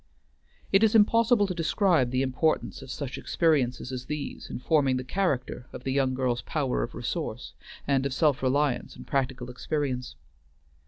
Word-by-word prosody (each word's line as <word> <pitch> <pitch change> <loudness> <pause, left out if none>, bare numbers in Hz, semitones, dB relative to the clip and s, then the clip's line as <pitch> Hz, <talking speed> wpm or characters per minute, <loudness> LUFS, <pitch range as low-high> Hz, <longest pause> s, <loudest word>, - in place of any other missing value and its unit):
It 195 +2 +5
is 220 0 +4
impossible 225 0 +5
to 190 - -3
describe 170 - +2
the 130 +1 +1
importance 135 +5 0
of 135 - -11
such 135 0 -5
experiences 135 -6 +1
as 125 -1 -6
these 150 -2 -5
in - - -4
forming 135 -1 +2
the 130 - -3
character 130 -6 -2
of - - -9
the 130 - -1
young 135 -2 +1
girl's 125 -2 0
power - - -1
of - - -4
resource, - - -4 0.3
and 135 -2 +2
wealth - - +1
of 135 - -5
self 150 -4 +2
reliance 135 0 0
and - - -11
practical 135 -3 -2
experience. 130 -1 -3
135 Hz, 170 wpm, -27 LUFS, 130-160 Hz, 0.3 s, It